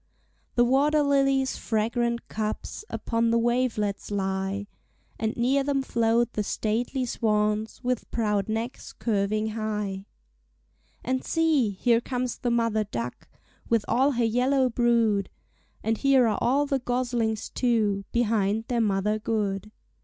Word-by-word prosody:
The 240 - +5
water 290 +4 +3
lilies' 275 -1 +2
fragrant 235 +2 -1
cups 215 - -4
Upon 230 0 0
the 230 - +3
wavelets 230 -4 0
lie, 195 0 -2 0.5
And 220 0 -2
near 265 +4 +2
them 275 -1 0
float 235 -1 +1
the 210 - -1
stately 230 +5 -1
swans, 215 -1 0
With 250 -1 -2
proud 210 -3 0
necks 225 +3 -4
curving 215 0 0
high. 210 -3 -3 1.0
And 260 0 -1
see! 315 -8 +2
here 230 +4 +2
comes 250 -1 -3
the 245 - -1
mother 230 -2 +1
duck 120 -8 -6 0.4
With 230 -3 +2
all 265 +5 +3
her 240 -1 +1
yellow 255 +3 +2
brood; 230 -4 +2 0.5
And 225 0 0
here 275 -3 +4
are 215 - 0
all 275 +5 +2
the 275 -1 0
goslings, 245 -3 -1
too, 215 -5 +1
Behind 220 -2 +1
their 240 -2 +1
mother 210 0 +1
good. 210 -2 -2
230 Hz, 130 wpm, -26 LUFS, 210-250 Hz, 1.0 s, The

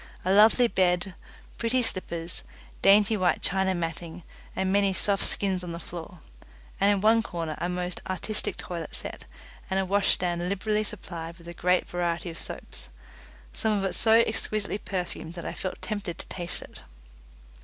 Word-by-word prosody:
A 185 - +3
lovely 220 +4 +7
bed, 185 -2 +1 0.5
pretty 240 +2 +2
slippers, 170 -5 -1 0.4
dainty 205 +2 +6
white 185 -3 +1
China 190 0 +2
matting 165 0 -4 0.3
and 190 0 0
many 200 -1 +3
soft 200 +1 +2
skins 190 -2 0
on 175 -1 -5
the 170 - -5
floor, 170 0 -8 0.6
and 200 +1 +5
in 200 -2 +1
one 225 +2 +5
corner 165 -7 -4
a 175 - -1
most 180 0 -3
artistic 190 +4 0
toilet 170 -3 -5
set, - - -2 0.4
and 190 0 +1
a 190 - +1
wash 200 +1 +2
stand 175 0 -1
liberally 210 +2 0
supplied 170 -5 -7
with 170 -1 -15
a 170 - -6
great 180 +1 +2
variety 175 0 -2
of 165 - -7
soap - - -4 0.9
some 220 -2 +1
of 195 - -1
it 190 - -1
so 220 - +4
exquisitely 215 -2 -1
perfumed 175 -4 -5
that 170 - -7
I - - -3
felt 185 - -5
tempted 205 -5 -3
to - - -4
taste 175 -1 -1
it. - - -13
185 Hz, 170 wpm, -27 LUFS, 175-205 Hz, 0.9 s, lovely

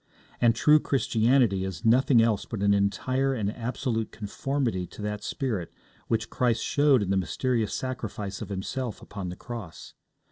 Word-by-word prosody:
And 115 -2 +5
true 150 +5 +5
Christianity 115 -6 +2
is 95 -2 -5
nothing 125 +1 +5
else 110 -3 +1
but 110 -4 -4
an 100 0 +4
entire 130 +7 +1
and 105 -2 -2
absolute 115 -2 -2
conformity 110 -2 -2
to - - -11
that 105 0 -3
spirit 110 - -3 0.4
which 110 0 -1
Christ 120 -2 +1
showed 145 -6 +3
in 95 - -2
the 95 - +2
mysterious 110 +4 0
sacrifice 110 -6 -4
of - - -6
Himself 105 +5 -4
upon 100 -3 -6
the 90 - -6
cross. 110 -7 -8
115 Hz, 155 wpm, -27 LUFS, 100-130 Hz, 0.4 s, And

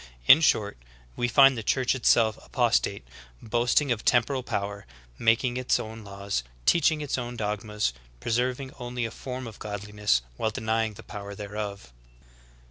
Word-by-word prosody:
In 145 - +8
short, 105 - +2 0.4
we 120 - 0
find 135 +2 +6
the 115 - -4
Church 125 +3 +1
itself 115 -3 +3
apostate, - - 0 0.3
boasting 120 +5 +1
of 115 -3 -1
temporal 130 +2 +2
power, 100 -4 -4 0.3
making 120 +2 +2
its 130 0 +1
own 110 0 -7
laws, 100 -5 -3 0.2
teaching 160 -2 +3
its 145 -3 -2
own 120 0 -5
dog 105 0 -2
mas, 105 - -1 0.3
preserving 125 - -1
only 125 -1 -3
a 115 - -4
form 130 +2 -6
of 110 -3 -10
godliness, 105 - -1
while 110 - 0
denying 110 0 -1
the - - -11
power 100 -1 -8
thereof. 100 - -6
110 Hz, 150 wpm, -27 LUFS, 105-125 Hz, 0.4 s, In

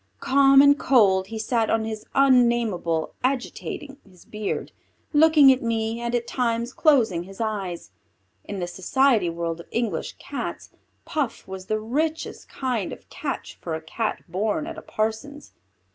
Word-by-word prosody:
Calm 275 0 +6
and 285 0 +5
cold 195 -7 +4
he 225 +2 -6
sat 225 0 0
on 225 -1 +1
his 220 -1 -6
unnamable, 235 -11 +2
agitating 275 +2 -3
his 185 -3 -20
beard, 210 -1 -4 0.4
looking 300 -2 +7
at 260 - +1
me 225 0 -1
and 240 0 -1
at 240 -1 -1
times 235 0 -1
closing 225 - +3
his 195 +1 -13
eyes. 200 -6 -3 0.5
In 200 - -6
the 180 - -2
society 205 +3 +2
world 170 0 -3
of 170 - -11
English 235 -2 -2
Cats, - - -6 0.3
Puff 285 -7 -3
was 190 0 -8
the 215 0 0
richest 300 +9 -3
kind 245 -7 -2
of - - -11
catch - - -5
for 165 -2 -3
a - - -4
Cat 215 +7 -3
born 210 - -1
at 330 0 -6
a - - -8
parson's. 225 +7 -4
225 Hz, 155 wpm, -24 LUFS, 195-270 Hz, 0.5 s, looking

